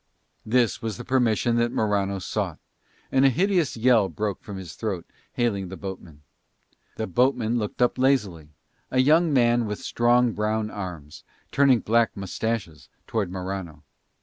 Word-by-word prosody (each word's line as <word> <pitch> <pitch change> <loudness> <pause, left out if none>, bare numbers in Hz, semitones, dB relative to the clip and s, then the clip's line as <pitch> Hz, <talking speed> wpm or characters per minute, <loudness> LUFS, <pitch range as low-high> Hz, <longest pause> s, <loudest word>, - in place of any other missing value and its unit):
This 120 -1 +2
was 110 -2 -4
the 120 - -8
permission 120 -2 +2
that 120 0 +1
Morano 100 -3 0
sought, 95 - -3 0.5
and 135 0 +3
a 135 - +7
hideous 175 - +1
yell 115 -4 +4
broke 105 -3 -3
from 100 -2 -8
his 90 -3 -8
throat 100 -7 -4 0.3
hailing 100 -6 -1
the 95 +1 -8
boatman. 90 -6 -9 0.7
The 110 - -2
boatman 120 +2 +1
looked 105 +3 -1
up 125 - +1
lazily, 105 - +1 0.4
a - - -2
young 155 +5 +4
man 120 -3 +3
with 105 0 -3
strong 120 0 +2
brown 110 0 -1
arms, 85 -7 -7 0.3
turning 135 -5 +4
black 115 0 +1
moustaches 95 -7 -4 0.2
towards 105 -5 -2
Morano. 90 -5 -6
110 Hz, 150 wpm, -25 LUFS, 95-125 Hz, 0.7 s, a